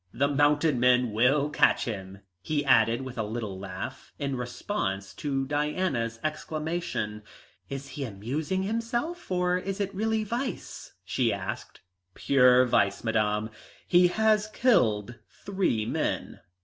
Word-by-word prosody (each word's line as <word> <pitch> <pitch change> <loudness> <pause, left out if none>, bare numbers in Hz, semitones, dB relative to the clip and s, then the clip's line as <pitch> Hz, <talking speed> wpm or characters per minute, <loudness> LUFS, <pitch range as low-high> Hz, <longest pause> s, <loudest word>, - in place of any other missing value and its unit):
"The 140 - +1
mounted 145 0 +2
men 125 -1 +4
will 135 +7 +2
catch - - +3
him," 95 -3 -6 0.2
he 145 +6 -1
added 115 -1 +4
with 130 -2 -7
a - - +1
little 105 -3 -4
laugh, 95 +7 -7
in 140 -2 -2
response 125 - -3
to 135 -2 -2
Diana's 145 -5 -1
exclamation. 155 -8 -3 0.5
"Is 140 0 -6
he 145 - -5
amusing 135 - -3
himself, 235 - -3
or 180 0 +1
is 195 +2 -4
it 200 -1 -2
really 220 +2 0
vice?" 240 +5 -5
she - - +1
asked. - - -5 0.3
"Pure 125 -2 +5
vice, 100 -5 +1
Madame. 110 -1 0 0.4
He 180 0 +6
has 215 +2 +2
killed 120 - +2 0.3
three 190 - 0
men." - - -2
140 Hz, 130 wpm, -27 LUFS, 115-180 Hz, 0.5 s, He